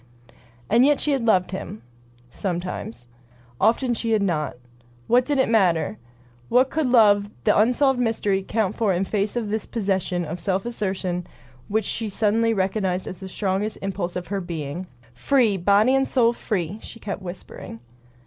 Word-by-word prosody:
And 230 +4 +4
yet 290 0 +4
she 300 - 0
had 260 -4 0
loved 185 -5 +3
him 115 - -6 0.2
— 120 0 -28
sometimes. 180 - -4 0.5
Often 240 +2 +2
she 230 -1 -1
had 210 -2 +2
not. 155 -8 -1 0.5
What 245 +1 +3
did 290 -1 +1
it 265 - +3
matter! 180 - +2 0.5
What 255 +2 +4
could 310 -3 0
love, 205 -4 +5
the - - +3
unsolved 250 +4 +3
mystery, 215 -5 +1
count 210 0 -1
for 215 -5 +1
in 180 +2 0
face 205 +2 -1
of 225 -4 -2
this 220 0 -2
possession 190 -5 -1
of 165 +3 -5
self 190 +3 -1
assertion 190 -6 -3 0.4
which 215 0 0
she 225 -2 -2
suddenly 220 +3 +2
recognized 190 -2 0
as 180 - -7
the 190 -1 -8
strongest 200 +2 -2
impulse 190 -2 -3
of 180 -1 -5
her 200 -1 -2
being! 170 0 -5 0.3
"Free! 230 - +2
Body 200 +7 +4
and 270 0 +2
soul 235 -3 +3
free!" 200 -4 -3
she 230 - -11
kept 200 -2 -5
whispering. 175 -10 -8
200 Hz, 170 wpm, -23 LUFS, 185-230 Hz, 0.5 s, love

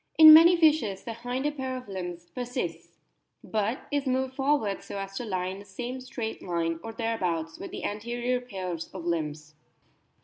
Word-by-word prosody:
In 315 -1 +12
many 335 +3 +9
fishes 300 - +3
the 230 - -5
hinder 245 +5 -2
pair 260 -3 -4
of 250 - -9
limbs 175 -3 -6
persists, 245 +2 -5 0.5
but 220 +3 -1
is 285 -1 0
moved 260 0 0
forwards 270 -7 0
so - - -5
as 195 0 -5
to 245 - -3
lie 185 -4 -2
in 190 +1 -4
the - - -10
same 245 +6 -5
straight 245 -3 -5
line, 165 -2 -1
or 225 - -6
thereabouts, 180 -8 -2
with - - -6
the - - -7
anterior 240 +4 -2
pairs 185 -8 -5
of 175 -3 -6
limbs. 155 -2 -3
225 Hz, 175 wpm, -28 LUFS, 185-255 Hz, 0.5 s, In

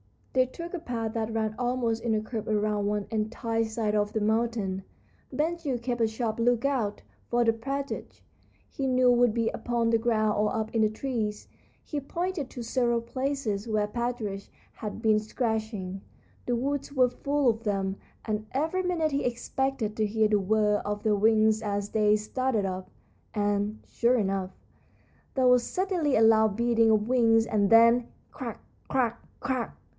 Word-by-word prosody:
They 255 0 +4
took 335 +7 -8
a 360 - -2
path 230 -7 -3
that 225 -1 -2
ran 220 -1 -1
almost 240 -2 0
in 230 -2 0
a 215 - 0
curve 220 0 -5
around 210 -1 0
one 205 -1 -1
entire 225 +1 -1
side 220 -1 -2
of 210 0 +1
the 220 - 0
mountain. 215 -3 0 0.5
Ben 325 +3 0
Gile 285 -7 -2
kept 240 0 -3
a 225 - +4
sharp 220 0 -3
lookout, 240 -2 +1 0.2
for 240 0 +2
the 225 -1 +3
partridge, 275 +4 -5 0.5
he 270 -2 -3
knew, 255 -1 +4
would 245 -2 +4
be 230 -1 +1
upon 235 -1 -1
the 230 0 +3
ground 215 -2 +1
or 210 +3 +1
up 220 0 -2
in 225 - +2
the 215 - +4
trees. 215 -2 -3 0.3
He 295 - -3
pointed 335 0 -3
to 245 - -7
several 235 0 +1
places 235 -4 -2
where 215 -2 +1
partridge 225 -3 -3 0.2
had 215 +1 -6
been 215 -1 +4
scratching. 215 -4 -3 0.5
The 245 - +1
woods 280 +3 -2
were 255 -2 +4
full 280 +2 +1
of 225 0 -1
them, 195 -2 -1 0.3
and 215 -1 -2
every 320 +7 0
minute 335 -4 0
he 280 0 -1
expected 245 -2 -1
to 215 - +2
hear 215 +1 +2
the 210 -1 +3
whir 210 +1 +2
of 205 0 -3
their 215 - +3
wings 215 +1 +3
as 205 -1 -2
they 210 -1 +3
started 220 0 -1
up. 185 0 -4 0.5
And, 205 +1 0
sure 240 +2 +2
enough, 195 -3 -1 0.8
there 260 -2 +3
was 250 0 +6
suddenly 355 -1 0
a - - +4
loud 220 -2 +5
beating 230 0 +3
of 215 -1 +3
wings, 230 -3 +4
and 205 -3 +1
then, 230 +1 +6 0.2
crack! - - -6 0.3
crack! 240 -3 0 0.2
crack! 255 -4 -2
225 Hz, 170 wpm, -28 LUFS, 215-250 Hz, 0.8 s, was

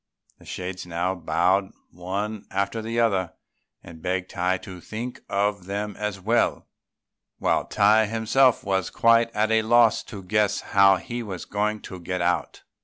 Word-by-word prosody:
The - - -18
shades 90 0 -6
now 90 +2 -1
bowed 90 +3 +1 0.2
one 100 +4 -4
after 100 +3 -2
the 115 +1 -2
other, 95 -7 +1 0.5
and 80 -1 -12
begged 90 +1 -2
Tai 90 +1 0
to 90 -4 -9
think 120 +6 -6
of 100 -1 0
them 100 +1 -4
as 105 -2 -4
well, 115 +6 0 0.7
while - - +1
Tai 105 +1 +4
himself 115 +4 +2
was 95 -3 0
quite 115 0 +4
at 110 +1 +1
a 110 0 +4
loss 115 0 +4
to 100 -4 -9
guess 105 +2 +1
how 100 -1 +5
he 120 +6 -5
was 95 -6 -6
going 105 +1 -1
to 95 - -9
get 90 +1 -4
out. 90 0 -1
100 Hz, 160 wpm, -24 LUFS, 90-110 Hz, 0.7 s, how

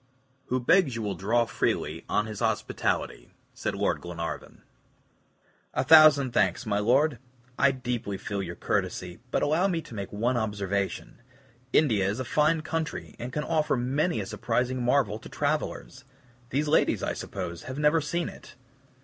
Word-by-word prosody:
"Who 130 - 0
begs 135 +1 +3
you 115 - -3
will 100 -1 -1
draw 115 +5 +1
freely - - -2
on 105 - +1
his 105 -2 -6
hospitality," - - -1 0.2
said - - -3
Lord - - 0
Glenarvan. 85 -1 -6 1.1
"A - - +2
thousand 155 -5 +7
thanks, 125 - +1
my 105 -2 0
Lord! 125 +5 +2 0.4
I 140 - +6
deeply 120 -6 -3
feel 100 0 -4
your 85 -2 -5
courtesy, 90 +1 -2
but - - 0
allow 160 +6 +2
me 175 -4 0
to 120 - -13
make 100 -3 -5
one 120 +4 0
observation: 100 -1 -2 0.5
India 105 -10 +3
is 105 +5 -3
a 130 - -3
fine 155 +5 +2
country, 160 0 -4
and 120 +2 -5
can 150 +2 -2
offer 150 -2 +1
many 135 +4 0
a 100 - -3
surprising 125 +5 -1
marvel 120 -4 +2
to - - -11
travelers. 145 -2 -2 0.5
These 145 +3 0
ladies, 150 - +2
I - - -1
suppose, 85 0 -6
have 130 - -5
never 150 +2 +3
seen 170 +4 -2
it. - - -11
125 Hz, 160 wpm, -27 LUFS, 105-150 Hz, 1.1 s, thousand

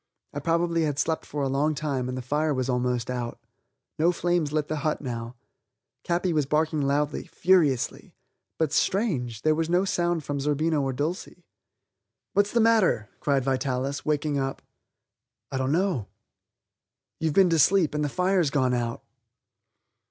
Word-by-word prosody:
I 145 - -3
probably 170 +2 +1
had 150 -3 0
slept 160 +2 -1
for 145 -1 -3
a - - +1
long 145 +3 +1
time 140 -4 -2
and 130 - -4
the 130 - -5
fire 150 +3 0
was 130 0 -1
almost 125 -1 0
out. 120 -2 -4 0.6
No 170 +3 +4
flames 175 -3 0
lit 150 -1 0
the 155 - -2
hut 150 +1 -1
now. 120 -3 -5 0.7
Capi 175 0 0
was 150 -3 +1
barking 155 +1 +1
loudly, 145 +1 0
furiously. 165 -9 +1 0.4
But, 155 -2 0
strange! 130 - 0
there 155 - +4
was 165 +1 -1
no 180 +3 +3
sound 175 -3 0
from 140 0 -3
Zerbino 150 +2 +1
or 135 -1 -1
Dulcie. 165 +5 -4 0.9
"What's 205 +1 +2
the 235 - +2
matter?" 220 - +3
cried 140 -2 +1
Vitalis, 130 +1 -1
waking 150 -1 0
up. 135 0 -3 0.9
"I 135 - -2
don't 130 +1 0
know." 170 - 0 1.1
"You've 160 -2 -1
been 190 -3 +5
to 165 - +3
sleep, 180 -1 +4
and 150 0 -1
the 145 - 0
fire's 180 0 +1
gone 130 -3 +1
out." 120 -1 -2
150 Hz, 160 wpm, -26 LUFS, 135-170 Hz, 1.1 s, been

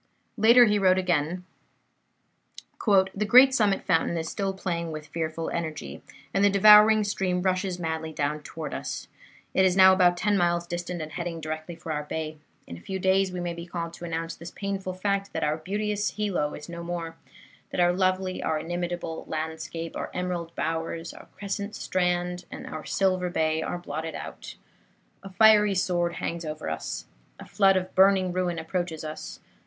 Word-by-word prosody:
'" - - -44
Later 235 +3 +7
he 210 -2 +2
wrote 185 -1 +4
again: 180 -1 0 1.4
"The 195 0 +3
great 255 +4 +8
summit 210 -6 +2
fountain 170 -1 +1
is 160 0 -3
still 195 +3 -2
playing 170 -3 -3
with 155 -1 -6
fearful 160 +1 -4
energy, 155 - -5 0.3
and 195 - +2
the 205 - +6
devouring 210 +2 +7
stream 185 -3 -1
rushes 185 -1 0
madly 160 -2 -3
down 150 0 -2
toward - - -7
us. - - -5 0.5
It 190 - +4
is 185 0 +3
now 190 0 +8
about 180 -2 +4
ten 205 +2 +1
miles 175 0 +1
distant, 175 -1 -4
and 155 - -8
heading 170 -1 -4
directly 155 +2 -5
for 165 -1 -7
our 150 -1 -1
bay. 155 +1 -5 0.3
In 85 - -9
a - - -14
few 190 - -4
days 190 0 +2
we 180 - -5
may 175 -1 -3
be 170 +1 -8
called 170 -1 -5
to - - -11
announce 165 -1 -3
the 170 +1 -9
painful 195 -2 -3
fact 200 +1 -1
that - - -2
our 150 0 +1
beauteous 205 +5 -2
Hilo 195 -8 -2
is 150 - -9
no 170 0 -7
more, 170 -1 -5 0.5
that - - -4
our 175 0 +4
lovely, 185 0 0
our 155 - 0
inimitable 175 0 -4
landscape, 160 +1 -5
our - - -4
emerald 175 -2 -3
bowers, 165 +1 -3
our - - -13
crescent 200 +1 -4
strand 180 -1 -1
and - - -8
our 155 -1 -7
silver 185 -2 +1
bay 160 -2 0
are - - -3
blotted 160 -2 -5
out. - - -8 0.7
A 195 - -9
fiery 210 0 +5
sword 175 -2 0
hangs 170 0 -4
over 155 - -5
us. 80 - -5 0.3
A - - -9
flood 195 -2 +3
of 185 0 -3
burning 190 -1 +4
ruin 180 -2 -1
approaches 165 0 -3
us. 155 0 -7
175 Hz, 180 wpm, -26 LUFS, 165-190 Hz, 1.4 s, great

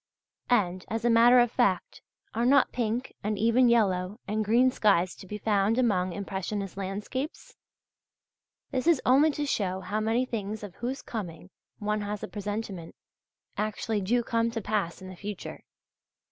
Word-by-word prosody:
And, 185 -7 +2
as 225 +1 -3
a 240 - +4
matter 235 +2 +7
of 240 -1 +4
fact, 200 -9 0 0.3
are 230 - 0
not 270 +2 +4
pink 240 +1 -2
and 210 0 -1
even 230 +4 +4
yellow 200 -3 +1
and 215 +1 0
green 240 +5 +4
skies 185 -6 +2
to 190 - -12
be 210 - -5
found 210 +1 +1
among 190 -7 +2
impressionist 195 +1 -4
landscapes? 210 - -5 1.2
This 260 +3 -1
is 335 -5 +5
only 275 +5 +5
to 295 0 -2
show 190 -8 -1
how 200 +4 -2
many 225 +4 +1
things 215 -3 -4
of 200 -4 -7
whose 255 +3 -4
coming 185 -5 -6 0.3
one 210 0 -1
has 205 0 -4
a - - -3
presentiment, 205 -4 -5 0.6
actually 215 0 -1
do 235 +5 +1
come 230 0 +1
to 230 0 -3
pass 200 -4 -2
in - - -8
the 185 - -9
future. 205 +1 -7
215 Hz, 160 wpm, -28 LUFS, 195-240 Hz, 1.2 s, matter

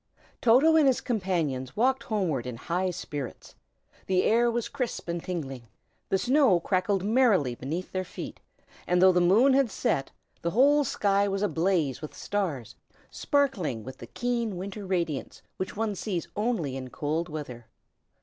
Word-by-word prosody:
TOTO 265 +8 +5
and 300 -3 +5
his 260 - +3
companions 170 - -2
walked 260 +3 +2
homeward 175 - -1
in 125 - -5
high 180 +8 -1
spirits. 145 -7 -6 0.5
The 185 -1 +2
air 235 +2 +3
was 235 0 -1
crisp 255 -9 -4
and 170 0 -3
tingling; 135 -9 -5 0.4
the 190 - +3
snow 250 - +4
crackled 185 +2 0
merrily 210 - +3
beneath 155 +9 -5
their 185 0 -2
feet; 185 - -8 0.5
and 180 0 +2
though 185 +1 +7
the 180 -1 +2
moon 220 +10 +5
had 270 -2 +3
set, 135 -8 -1 0.3
the 170 - 0
whole 285 +9 +4
sky 200 -5 +1
was 195 0 -1
ablaze 165 -8 0
with 155 - -8
stars, 170 - -3 0.4
sparkling 210 - 0
with 130 +2 -9
the 120 - -9
keen, 235 - -2
winter 195 +2 -6
radiance 170 -7 -2
which 190 +1 -5
one 220 -1 0
sees 185 -3 -3
only 205 - -1
in 130 -1 -6
cold 155 +6 -2
weather. 125 -7 -7
185 Hz, 160 wpm, -27 LUFS, 155-230 Hz, 0.5 s, though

